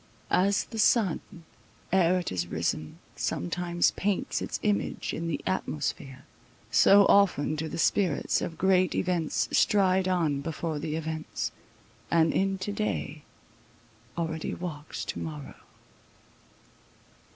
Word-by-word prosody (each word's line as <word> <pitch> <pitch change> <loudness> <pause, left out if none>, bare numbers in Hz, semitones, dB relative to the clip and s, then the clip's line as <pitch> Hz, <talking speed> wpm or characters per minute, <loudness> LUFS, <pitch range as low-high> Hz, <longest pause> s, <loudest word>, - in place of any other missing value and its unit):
As 200 +2 +3
the 225 - -8
sun, 210 -4 +3 0.7
Ere 185 -1 +4
it 180 - -3
is 85 -2 -2
risen, 80 -2 -2 0.2
sometimes 175 - 0
paints 200 -1 -1
its - - -3
image 210 -1 -1
In 165 - -3
the 150 -4 -2
atmosphere—so 150 +4 +1
often 180 -8 +3
do 160 +1 -3
the - - -5
spirits 175 -2 +1
Of 165 - -4
great 185 0 +3
events 175 -4 0
stride 190 -3 +3
on 160 -6 +1
before 160 0 -3
the 150 +1 -3
events, 160 -1 -4 0.6
And 165 -1 +3
in 195 0 +1
to 190 +2 -4
day 200 -7 -3 1.0
already 160 -1 -3
walks 155 -4 -6
to - - -4
morrow. 150 -3 -6
170 Hz, 120 wpm, -28 LUFS, 155-190 Hz, 1.0 s, Ere